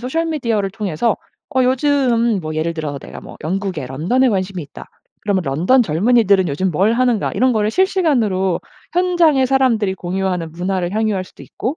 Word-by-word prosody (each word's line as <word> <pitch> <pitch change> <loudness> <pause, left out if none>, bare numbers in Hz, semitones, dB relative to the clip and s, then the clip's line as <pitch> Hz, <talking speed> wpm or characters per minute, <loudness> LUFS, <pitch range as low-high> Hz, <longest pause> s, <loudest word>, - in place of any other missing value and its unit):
소셜 265 +7 -1
미디어를 230 -11 -1
통해서 205 +2 -1 0.4
어 260 0 +2
요즘 255 -4 +2
뭐 155 -3 -5
예를 160 +2 -1
들어서 150 -3 -4
'내가 - - -9
뭐 - - -12
영국의 180 -4 -3
런던에 180 - +1
관심이 190 -4 -2
있다.' 140 - -12 0.3
그러면 200 -3 0
'런던 175 - +3
젊은이들은 200 +1 +3
요즘 175 +5 -1
뭘 195 +7 +2
하는가.' 240 -3 +1
이런 255 0 +2
거를 215 -1 0
실시간으로 230 - +1 0.3
현장에 345 -6 +3
사람들이 245 -7 +2
공유하는 180 -2 -3
문화를 180 +1 -2
향유할 215 -4 0
수도 - - -15
있고 265 +7 -4
205 Hz, 400 characters per minute, -18 LUFS, 180-255 Hz, 0.4 s, 런던